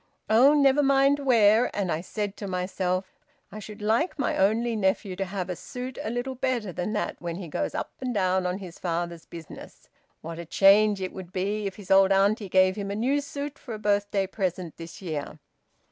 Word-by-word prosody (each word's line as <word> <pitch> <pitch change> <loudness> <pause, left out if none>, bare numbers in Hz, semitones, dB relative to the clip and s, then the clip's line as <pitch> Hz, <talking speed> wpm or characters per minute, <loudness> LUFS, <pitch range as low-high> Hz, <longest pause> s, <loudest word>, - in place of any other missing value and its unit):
Oh, 260 +7 +6
never 280 0 +4
mind 275 0 +4
where. 235 -4 +4
And 190 -4 0
I 155 - -1
said 205 +2 -4
to 200 - -5
myself; 185 0 -2 0.3
`I 215 - -7
should 210 0 -9
like 230 - +1
my 280 - 0
only 225 +4 +2
nephew 190 -1 0
to 195 - -1
have 185 -1 -4
a 180 - -3
suit 250 +7 -7
a - - -3
little 245 +3 -3
better 245 -7 -2
than 180 +6 -3
that 210 - -2
when 170 -1 -4
he 180 -1 -7
goes 150 - -3
up - - -3
and 255 -1 -2
down 185 -3 +1
on 180 +1 -2
his 185 -4 -10
father's 170 -1 -3
business. 165 -3 -11 0.3
What 165 +1 -7
a 170 - -6
change 200 +2 +5
it 185 - -4
would 185 -2 -9
be 200 +3 -1
if 195 - -6
his 200 -3 -9
old 195 0 +6
auntie 200 +1 +2
gave 185 +1 +4
him 200 -1 -4
a 200 - -3
new 265 +7 +1
suit 285 0 -6
for 235 -5 -7
a - - -6
birthday 205 -1 +1
present 185 -3 -3
this 165 +3 -10
year!'" 155 -3 -4
200 Hz, 205 wpm, -26 LUFS, 185-230 Hz, 0.3 s, Oh